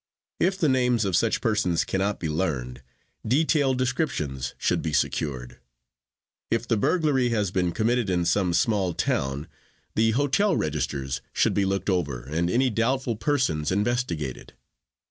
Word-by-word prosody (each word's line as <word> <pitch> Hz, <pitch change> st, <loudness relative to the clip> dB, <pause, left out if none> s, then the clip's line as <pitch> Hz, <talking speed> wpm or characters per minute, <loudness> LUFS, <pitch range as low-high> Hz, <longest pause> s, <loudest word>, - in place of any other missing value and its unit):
If 190 Hz, +2 st, +2 dB
the 165 Hz, -, +2 dB
names 125 Hz, -4 st, +2 dB
of 95 Hz, -3 st, 0 dB
such 115 Hz, +4 st, +1 dB
persons 105 Hz, -7 st, +1 dB
cannot 100 Hz, +2 st, -1 dB
be 85 Hz, -, -2 dB
learned, 70 Hz, -7 st, -2 dB, 0.4 s
detailed 140 Hz, +1 st, +2 dB
descriptions 75 Hz, -, -2 dB
should -, -, 0 dB
be 80 Hz, -, -3 dB
secured. 65 Hz, -4 st, -2 dB, 0.9 s
If 115 Hz, +1 st, -1 dB
the 115 Hz, -, +2 dB
burglary 140 Hz, -, +2 dB
has 105 Hz, -5 st, 0 dB
been 90 Hz, -2 st, 0 dB
committed 115 Hz, +1 st, 0 dB
in 90 Hz, -2 st, +1 dB
some 90 Hz, 0 st, +1 dB
small 100 Hz, -8 st, +1 dB
town, 70 Hz, +2 st, -1 dB, 0.5 s
the 110 Hz, +1 st, +3 dB
hotel 145 Hz, -, +2 dB
registers 70 Hz, -3 st, -2 dB
should -, -, +2 dB
be 100 Hz, -, +1 dB
looked 95 Hz, 0 st, -1 dB
over 75 Hz, -10 st, -1 dB
and 85 Hz, +5 st, -1 dB
any 125 Hz, +6 st, +2 dB
doubtful 120 Hz, +2 st, 0 dB
persons 105 Hz, -, 0 dB
investigated. 100 Hz, -, -2 dB
100 Hz, 145 wpm, -25 LUFS, 80-125 Hz, 0.9 s, the